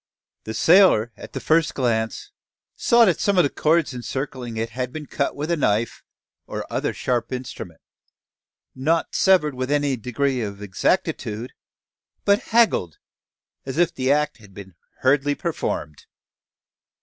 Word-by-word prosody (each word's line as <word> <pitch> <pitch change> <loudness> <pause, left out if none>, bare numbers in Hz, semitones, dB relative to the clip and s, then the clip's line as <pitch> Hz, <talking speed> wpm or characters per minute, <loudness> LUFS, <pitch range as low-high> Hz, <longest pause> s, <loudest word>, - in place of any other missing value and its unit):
The 110 - -5
sailor 165 - +5
at - - -12
the - - -3
first 160 0 +2
glance 115 -4 -1 0.4
saw 235 0 +5
that 180 -6 +2
some 200 -2 +1
of 180 - +6
the 140 - 0
chords 155 -2 +1
encircling 125 -1 -5
it 115 +1 -3
had 125 +1 -3
been 155 +2 -7
cut 140 - -2
with 150 +4 -3
a - - +3
knife, 115 -6 0 0.5
or - - -5
other - - 0
sharp 120 -2 -2
instrument, 125 - -7 0.9
not 160 +5 0
severed 180 -7 +3
with 130 0 -4
any 145 -2 +1
degree 125 +2 -1
of 100 -2 -5
exactitude, 105 +3 -1 0.7
but 200 +1 +4
"haggled," 220 - +2 0.7
as 135 +2 -6
if 175 0 +2
the 130 +1 0
act 150 +1 +1
had 105 -4 -18
been 95 -2 -10 0.3
hurriedly 140 +2 +2
performed. 80 - -4
130 Hz, 145 wpm, -23 LUFS, 115-155 Hz, 0.9 s, of